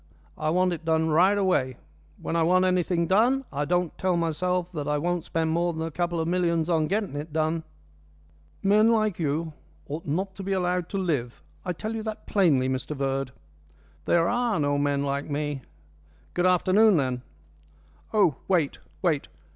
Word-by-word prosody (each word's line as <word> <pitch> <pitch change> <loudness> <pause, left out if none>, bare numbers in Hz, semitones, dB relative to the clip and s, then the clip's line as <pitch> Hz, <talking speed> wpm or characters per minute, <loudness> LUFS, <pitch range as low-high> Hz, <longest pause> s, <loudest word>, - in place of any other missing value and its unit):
I 155 - -2
want 180 +2 +2
it 170 - -6
done 160 0 +1
right 185 +6 +4
away. 140 -10 +1 0.4
When - - -3
I 165 - +2
want 185 +3 +4
anything 180 -2 +1
done 240 +9 +3
I 145 +2 -1
don't 175 +1 0
tell 185 -2 +1
myself 180 +2 -1
that 150 -5 -4
I 150 0 +1
won't 175 +2 -1
spend 160 -1 -1
more 170 +1 +1
than 160 0 -4
a 165 - -5
couple 175 +1 -1
of 160 - -1
millions 170 -1 +1
on 160 -2 +2
getting 200 -4 -1
it 150 +2 -5
done." 160 +1 0 1.0
"Men 210 +3 +5
like 215 -5 +1
you 160 +1 -1 0.3
ought 155 +3 -6
not 190 +7 -1
to - - -6
be 195 0 -2
allowed 180 -2 0
to 195 - -3
live. 145 -11 -2 0.2
I 180 - -2
tell 215 +6 -5
you 225 - -3
that 215 0 -6
plainly, 155 -11 +3
Mr 130 +3 -3
Verd." 135 -1 -1 0.8
"There 170 -1 +3
are 240 -5 +1
no 145 -1 +1
men 145 -1 +1
like 140 +1 -2
me. 145 -1 -2 0.7
Good 180 +1 +2
afternoon, 185 +3 +4
then." 130 -3 -1 0.9
"Oh, 190 -9 +3
wait, 170 -7 +1 0.2
wait! 160 -6 +1
170 Hz, 180 wpm, -26 LUFS, 150-185 Hz, 1.0 s, Men